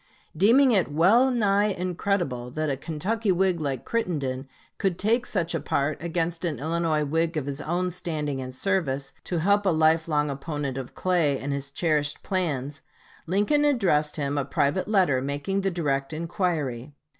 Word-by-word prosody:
Deeming 240 Hz, -, +5 dB
it 190 Hz, -8 st, +2 dB
well 200 Hz, -, +5 dB
nigh 205 Hz, -5 st, +2 dB
incredible 180 Hz, -9 st, -2 dB
that 155 Hz, +3 st, -2 dB
a -, -, 0 dB
Kentucky 190 Hz, -, -1 dB
Whig 185 Hz, -1 st, +2 dB
like 140 Hz, -5 st, -3 dB
Crittenden 140 Hz, -, -2 dB, 0.3 s
could 190 Hz, -4 st, 0 dB
take 230 Hz, +6 st, +1 dB
such 175 Hz, -4 st, -1 dB
a 165 Hz, -, 0 dB
part 145 Hz, +1 st, -1 dB
against 170 Hz, 0 st, -2 dB
an 165 Hz, -6 st, -1 dB
Illinois 160 Hz, +1 st, 0 dB
Whig 165 Hz, +2 st, 0 dB
of 145 Hz, -, -2 dB
his 140 Hz, 0 st, -4 dB
own 180 Hz, +4 st, -1 dB
standing 150 Hz, -6 st, -3 dB
and 130 Hz, 0 st, -7 dB
service, 140 Hz, -6 st, -1 dB
to 175 Hz, -, -2 dB
help 200 Hz, +4 st, +3 dB
a 195 Hz, -, +2 dB
life 160 Hz, 0 st, +3 dB
long 150 Hz, -2 st, +1 dB
opponent 140 Hz, -1 st, -4 dB
of 135 Hz, -2 st, -6 dB
Clay 170 Hz, -7 st, +1 dB
and 140 Hz, +1 st, -3 dB
his 140 Hz, 0 st, -4 dB
cherished 150 Hz, -1 st, -1 dB
plans, 150 Hz, -7 st, -2 dB, 0.5 s
Lincoln 205 Hz, -, +2 dB
addressed 190 Hz, -, +2 dB
him 145 Hz, -1 st, -1 dB
a -, -, 0 dB
private 145 Hz, +5 st, 0 dB
letter 185 Hz, -11 st, +3 dB
making 145 Hz, +8 st, -2 dB
the 195 Hz, -, +1 dB
direct 145 Hz, -5 st, -1 dB
inquiry. 155 Hz, -, -2 dB
160 Hz, 165 wpm, -26 LUFS, 140-190 Hz, 0.5 s, Deeming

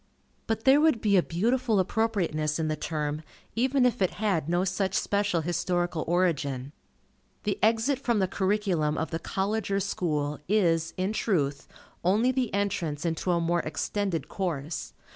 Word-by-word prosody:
But 225 Hz, 0 st, -1 dB
there 270 Hz, +2 st, +6 dB
would 310 Hz, -7 st, +4 dB
be 205 Hz, -2 st, +2 dB
a 185 Hz, -, +6 dB
beautiful 225 Hz, +6 st, +1 dB
appropriateness 180 Hz, -7 st, 0 dB
in 160 Hz, -1 st, -1 dB
the 155 Hz, -, 0 dB
term, 150 Hz, -1 st, -3 dB, 0.3 s
even 260 Hz, +2 st, +2 dB
if 245 Hz, -5 st, +1 dB
it 185 Hz, -, +1 dB
had 190 Hz, -8 st, 0 dB
no 175 Hz, +1 st, +2 dB
such 190 Hz, +1 st, -1 dB
special 200 Hz, -4 st, +1 dB
historical 175 Hz, 0 st, -1 dB
origin. 145 Hz, -7 st, 0 dB, 0.7 s
The 205 Hz, -2 st, -1 dB
exit 230 Hz, +5 st, +2 dB
from 240 Hz, -4 st, +1 dB
the 190 Hz, -2 st, +2 dB
curriculum 190 Hz, -6 st, 0 dB
of 160 Hz, -, -2 dB
the 165 Hz, -, -2 dB
College 200 Hz, +4 st, -2 dB
or 195 Hz, 0 st, +1 dB
School, 150 Hz, -7 st, -1 dB
is, 170 Hz, -5 st, +2 dB
in 190 Hz, +3 st, 0 dB
truth, 145 Hz, -11 st, 0 dB, 0.4 s
only 215 Hz, +8 st, +3 dB
the 255 Hz, -3 st, -1 dB
entrance 180 Hz, -7 st, -1 dB
into 165 Hz, +2 st, -1 dB
a 175 Hz, -1 st, +3 dB
more 170 Hz, +1 st, +1 dB
extended 190 Hz, +2 st, -2 dB
course. 165 Hz, -5 st, -3 dB
185 Hz, 160 wpm, -28 LUFS, 165-210 Hz, 0.7 s, there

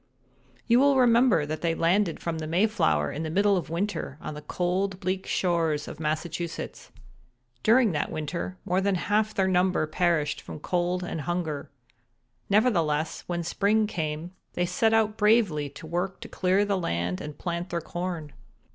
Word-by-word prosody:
"You 240 Hz, 0 st, +5 dB
will 280 Hz, 0 st, +5 dB
remember 235 Hz, -, +4 dB
that 155 Hz, +1 st, -4 dB
they 165 Hz, -1 st, +1 dB
landed 170 Hz, +2 st, +2 dB
from 165 Hz, -1 st, -3 dB
the 155 Hz, -, -4 dB
Mayflower 165 Hz, -, +2 dB
in 150 Hz, -, -4 dB
the 160 Hz, -, -3 dB
middle 200 Hz, +4 st, +3 dB
of 180 Hz, -, -2 dB
winter 170 Hz, -4 st, -3 dB
on 155 Hz, -, -6 dB
the 150 Hz, -, -8 dB
cold 185 Hz, +4 st, -1 dB
bleak 185 Hz, 0 st, -2 dB
shores 165 Hz, -4 st, 0 dB
of -, -, -8 dB
Massachusetts. 160 Hz, +2 st, -4 dB, 0.7 s
During 230 Hz, -1 st, +5 dB
that 150 Hz, -3 st, -1 dB
winter 170 Hz, +4 st, -4 dB
more 185 Hz, +2 st, +1 dB
than 200 Hz, 0 st, +1 dB
half 215 Hz, +4 st, 0 dB
their 190 Hz, -1 st, +2 dB
number 180 Hz, -3 st, +2 dB
perished 165 Hz, -1 st, 0 dB
from -, -, -8 dB
cold 180 Hz, +2 st, -1 dB
and 165 Hz, -3 st, -4 dB
hunger. 160 Hz, -2 st, -3 dB, 0.8 s
Nevertheless, 170 Hz, -8 st, +1 dB
when 175 Hz, -1 st, -2 dB
spring 205 Hz, +5 st, +2 dB
came 160 Hz, -3 st, -3 dB, 0.2 s
they 175 Hz, -, 0 dB
set 225 Hz, +4 st, +2 dB
out 220 Hz, -1 st, +2 dB
bravely 210 Hz, -10 st, +3 dB
to 140 Hz, +3 st, -11 dB
work 175 Hz, +4 st, -2 dB
to -, -, -7 dB
clear 190 Hz, +3 st, +1 dB
the 200 Hz, -2 st, 0 dB
land 90 Hz, -, -2 dB
and 150 Hz, -1 st, -7 dB
plant 170 Hz, 0 st, -3 dB
their 170 Hz, -, -1 dB
corn. 170 Hz, -3 st, -5 dB
175 Hz, 165 wpm, -27 LUFS, 155-200 Hz, 0.8 s, You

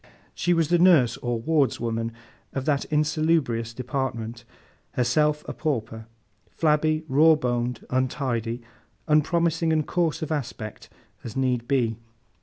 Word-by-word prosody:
She 175 Hz, +1 st, +1 dB
was 165 Hz, -2 st, +1 dB
the 175 Hz, 0 st, +3 dB
nurse, 165 Hz, -10 st, +5 dB
or 120 Hz, -1 st, -2 dB
wardswoman, 115 Hz, -5 st, 0 dB, 0.4 s
of 135 Hz, -1 st, -3 dB
that 145 Hz, -3 st, +1 dB
insalubrious 150 Hz, -6 st, +1 dB
department—herself 125 Hz, +3 st, -2 dB
a -, -, -4 dB
pauper—flabby, 140 Hz, +5 st, -2 dB
raw 155 Hz, +4 st, +6 dB
boned, 120 Hz, -4 st, -2 dB
untidy—unpromising 135 Hz, +6 st, -1 dB
and 155 Hz, -2 st, +1 dB
coarse 170 Hz, -2 st, 0 dB
of 155 Hz, -, -4 dB
aspect 120 Hz, -7 st, -5 dB, 0.3 s
as 115 Hz, +2 st, -7 dB
need 125 Hz, -3 st, 0 dB
be. 115 Hz, -5 st, +1 dB
135 Hz, 105 wpm, -25 LUFS, 115-155 Hz, 0.4 s, raw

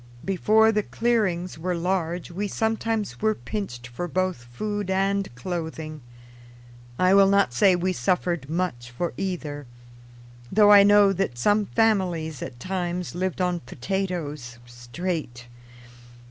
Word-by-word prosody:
Before 215 Hz, +4 st, +4 dB
the 210 Hz, -1 st, +1 dB
clearings 195 Hz, -8 st, -1 dB
were 180 Hz, +2 st, -1 dB
large 175 Hz, 0 st, -2 dB
we 200 Hz, +4 st, -3 dB
sometimes 220 Hz, 0 st, -2 dB
were 215 Hz, 0 st, +2 dB
pinched 190 Hz, -, -5 dB
for 125 Hz, +9 st, -5 dB
both 185 Hz, -7 st, -2 dB
food 205 Hz, -, -4 dB
and 195 Hz, +1 st, 0 dB
clothing. 160 Hz, 0 st, -5 dB, 1.0 s
I 185 Hz, +1 st, +4 dB
will 195 Hz, 0 st, +7 dB
not 200 Hz, -11 st, +3 dB
say 185 Hz, +9 st, +4 dB
we 185 Hz, +1 st, 0 dB
suffered 170 Hz, 0 st, -1 dB
much 160 Hz, -8 st, -2 dB
for 165 Hz, +8 st, -3 dB
either, 150 Hz, -7 st, -4 dB, 0.8 s
though 210 Hz, 0 st, +6 dB
I 205 Hz, -1 st, +9 dB
know 205 Hz, 0 st, +6 dB
that 190 Hz, -10 st, -2 dB
some 205 Hz, -, +2 dB
families 180 Hz, -, 0 dB
at 120 Hz, -, -7 dB
times 180 Hz, +2 st, -3 dB
lived 185 Hz, +1 st, -2 dB
on 180 Hz, -1 st, 0 dB
potatoes, 150 Hz, -4 st, -4 dB
straight. 120 Hz, +2 st, -5 dB
180 Hz, 130 wpm, -25 LUFS, 155-200 Hz, 1.0 s, I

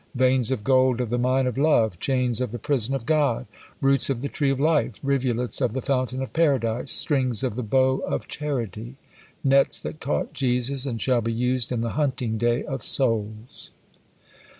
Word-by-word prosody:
Veins 130 Hz, -2 st, +3 dB
of 130 Hz, -6 st, -2 dB
gold 130 Hz, 0 st, +3 dB
of 120 Hz, -3 st, -3 dB
the 120 Hz, -, 0 dB
mine 130 Hz, +2 st, +1 dB
of 125 Hz, 0 st, -2 dB
love! 115 Hz, -, +2 dB
Chains 125 Hz, -3 st, 0 dB
of 125 Hz, -4 st, -2 dB
the 120 Hz, -, -5 dB
prison 130 Hz, +1 st, 0 dB
of 125 Hz, -4 st, -5 dB
God! 150 Hz, -, +1 dB, 0.4 s
Roots 135 Hz, -1 st, +3 dB
of 125 Hz, -3 st, -2 dB
the 140 Hz, -, -2 dB
tree 140 Hz, -2 st, -1 dB
of 135 Hz, -1 st, -1 dB
life! 150 Hz, -4 st, +1 dB
Rivulets 130 Hz, -3 st, -1 dB
of 125 Hz, -4 st, 0 dB
the 130 Hz, -, -2 dB
fountain 130 Hz, 0 st, -1 dB
of 130 Hz, -, -8 dB
Paradise! 130 Hz, -7 st, +1 dB
Strings 130 Hz, -, +2 dB
of 130 Hz, -, -1 dB
the 125 Hz, -, -3 dB
bow 130 Hz, +3 st, +1 dB
of -, -, -4 dB
charity! 120 Hz, -5 st, -4 dB, 0.5 s
Nets 135 Hz, 0 st, +3 dB
that 155 Hz, -, -7 dB
caught 140 Hz, -, -2 dB
Jesus, 130 Hz, +1 st, -1 dB
and 115 Hz, -4 st, -3 dB
shall 125 Hz, +1 st, +1 dB
be 115 Hz, +1 st, -2 dB
used 125 Hz, +1 st, 0 dB
in 120 Hz, -2 st, -1 dB
the 115 Hz, -1 st, -2 dB
hunting 130 Hz, -6 st, -1 dB
day 120 Hz, +1 st, +1 dB
of 135 Hz, -3 st, -5 dB
souls!" 110 Hz, -2 st, -1 dB
130 Hz, 190 wpm, -24 LUFS, 120-135 Hz, 0.5 s, Veins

